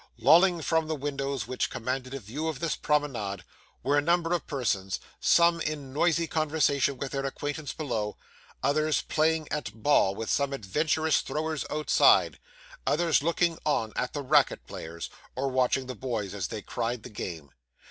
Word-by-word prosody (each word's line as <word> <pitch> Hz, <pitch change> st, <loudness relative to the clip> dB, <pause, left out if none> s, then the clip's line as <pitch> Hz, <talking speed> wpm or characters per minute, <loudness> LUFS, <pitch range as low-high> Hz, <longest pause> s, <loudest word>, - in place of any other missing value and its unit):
Lolling 175 Hz, -1 st, +5 dB
from 160 Hz, 0 st, +1 dB
the 155 Hz, -, -1 dB
windows 140 Hz, -4 st, -3 dB
which 130 Hz, -, -2 dB
commanded 130 Hz, +2 st, -3 dB
a -, -, -4 dB
view 130 Hz, +9 st, -5 dB
of 155 Hz, -4 st, -3 dB
this 165 Hz, -1 st, -1 dB
promenade 120 Hz, -, -1 dB, 0.4 s
were 145 Hz, +3 st, +3 dB
a -, -, +1 dB
number 170 Hz, +2 st, +2 dB
of 170 Hz, -4 st, -2 dB
persons, 100 Hz, -9 st, -1 dB, 0.2 s
some 170 Hz, -1 st, +4 dB
in 145 Hz, -4 st, -4 dB
noisy 170 Hz, +2 st, +2 dB
conversation 150 Hz, -4 st, +1 dB
with 135 Hz, +1 st, -4 dB
their 135 Hz, -1 st, -2 dB
acquaintance 145 Hz, +1 st, -4 dB
below, 110 Hz, -9 st, -3 dB, 0.5 s
others 155 Hz, +3 st, +2 dB
playing 160 Hz, 0 st, +1 dB
at 150 Hz, -8 st, -2 dB
ball 120 Hz, -9 st, +4 dB
with 115 Hz, -, -3 dB
some 140 Hz, -1 st, +1 dB
adventurous 155 Hz, +7 st, +1 dB
throwers 155 Hz, +2 st, -3 dB
outside, 155 Hz, 0 st, +4 dB, 0.5 s
others 165 Hz, -1 st, +3 dB
looking 170 Hz, +1 st, +1 dB
on 115 Hz, -8 st, 0 dB
at 125 Hz, -, -2 dB
the 145 Hz, -, -3 dB
racket 145 Hz, +1 st, +3 dB
players, 85 Hz, +1 st, -7 dB, 0.2 s
or 135 Hz, +1 st, -1 dB
watching 130 Hz, 0 st, +1 dB
the 130 Hz, -, -5 dB
boys 110 Hz, -5 st, -3 dB
as 100 Hz, -3 st, -3 dB
they 110 Hz, -3 st, -6 dB
cried 120 Hz, -1 st, -3 dB
the -, -, -8 dB
game. 80 Hz, -8 st, -6 dB
140 Hz, 165 wpm, -28 LUFS, 125-155 Hz, 0.5 s, Lolling